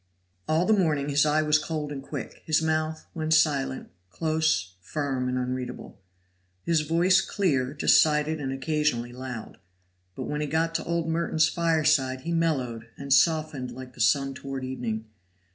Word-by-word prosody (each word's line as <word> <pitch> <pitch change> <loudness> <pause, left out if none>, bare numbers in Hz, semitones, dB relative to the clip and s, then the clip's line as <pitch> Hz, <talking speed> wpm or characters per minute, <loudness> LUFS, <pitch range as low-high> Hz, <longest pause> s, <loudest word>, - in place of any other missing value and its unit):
All 160 +3 +2
the 220 - +4
morning 155 -8 +1
his 145 +1 +3
eye 155 +1 +3
was 150 0 +3
cold 155 -1 -4
and 140 -2 -5
quick; - - -7
his 155 -1 +2
mouth, 155 0 -1
when 155 -1 -3
silent, 150 -4 +2 0.2
close, 155 - 0
firm, 135 +3 -2
and 125 - -1
unreadable; 125 -4 -5 0.6
his 165 -2 +2
voice 175 +5 +3
clear, 140 -11 0
decided, 155 +1 +3
and 135 -1 -2
occasionally 135 -4 -1
loud. 125 -3 -7 0.6
But - - -5
when 150 0 -3
he 150 - -1
got 165 +2 0
to - - -2
old 170 -1 -1
Merton's 160 -1 +2
fireside 155 -6 +1
he 165 - -4
mellowed 130 -9 -1
and 140 -1 0
softened 155 -5 +2
like 130 +1 -9
the 125 - -7
sun 135 +3 +3
toward 135 0 -6
evening. 120 -4 -4
150 Hz, 160 wpm, -26 LUFS, 130-160 Hz, 0.6 s, the